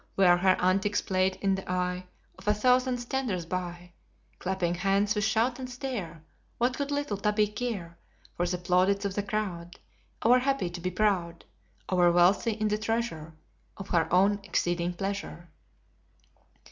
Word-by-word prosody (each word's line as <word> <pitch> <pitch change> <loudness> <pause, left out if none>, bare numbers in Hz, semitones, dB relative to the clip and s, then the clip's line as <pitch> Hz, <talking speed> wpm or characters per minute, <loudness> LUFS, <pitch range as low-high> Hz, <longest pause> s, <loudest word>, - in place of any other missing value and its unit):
Were 180 -2 +6
her 185 +1 +3
antics 195 +3 +2
played 185 0 0
in 195 -1 +3
the 190 -1 -4
eye 180 0 -1 0.3
Of - - -16
a 210 - +4
thousand 250 +3 +3
standers 240 -8 -2
by, 175 0 -5 0.5
Clapping 185 -2 -1
hands 195 +3 +1
with 210 -1 -1
shout 225 +4 +1
and 255 -1 -5
stare, 240 - -5 0.3
What 245 +2 0
would 280 0 -2
little 285 -8 -2
Tabby 210 +1 +2
care 210 -7 -5 0.4
For 175 - 0
the 180 +1 -1
plaudits 185 +3 +2
of 200 - -1
the 205 - -1
crowd? 195 -4 -4 0.5
Over 245 +3 +6
happy 265 -8 0
to 175 0 -7
be 180 - -1
proud, 180 -4 0 0.4
Over 180 -2 +4
wealthy 180 +6 +3
in 215 0 -1
the 210 0 0
treasure 215 -9 -3 0.4
Of 195 0 -8
her 165 -3 +1
own 200 +3 +4
exceeding 175 -2 -1
pleasure. 195 -3 -5
195 Hz, 160 wpm, -28 LUFS, 175-215 Hz, 0.5 s, Were